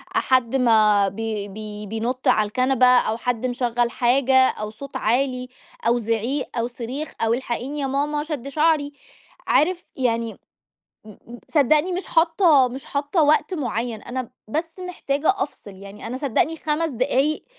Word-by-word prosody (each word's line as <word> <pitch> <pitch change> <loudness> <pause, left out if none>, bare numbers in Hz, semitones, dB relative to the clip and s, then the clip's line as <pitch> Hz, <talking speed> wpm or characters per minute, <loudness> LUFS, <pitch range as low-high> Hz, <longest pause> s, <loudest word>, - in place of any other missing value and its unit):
حد 255 -1 +2
ما 215 -5 +4
بي 210 0 -4
بي 210 +1 -8
بينط 230 +5 -3
على 215 -1 +4
الكنبة 255 +3 +2
أو 245 -3 +4
حد 245 0 -2
مشغّل 245 -1 0
حاجة 260 +2 +2
أو 210 0 -5
صوت 275 +5 -8
عالي 255 +2 0 0.4
أو 240 +1 +3
زعيق 230 +5 -1
أو 235 +1 0
صريخ 250 +5 -5
أو 225 0 +2
"الحقيني 260 +3 -3
يا 275 - -1
ماما، 295 +2 -1
شد 295 -5 -5
شعري." 300 0 +1 0.5
عارف 350 +3 +2
يعني 230 -3 -1 0.7
مم 230 +3 -13
صدّقني 305 +4 +3
مش 365 +2 -4
حاطة 325 -5 +4
مش 265 +4 -8
حاطة 290 +4 0
وقت 305 +5 +3
معيّن، 235 -5 -3
أنا 255 -1 -5 0.2
بس 325 - -3
محتاجة 285 -4 -2
أفصل 280 - -5
يعني، 200 +3 -10
أنا 245 - -4
صدّقني 280 +4 0
5 315 +1 -1
دقايق 270 +4 0
255 Hz, 145 wpm, -22 LUFS, 230-290 Hz, 0.7 s, ما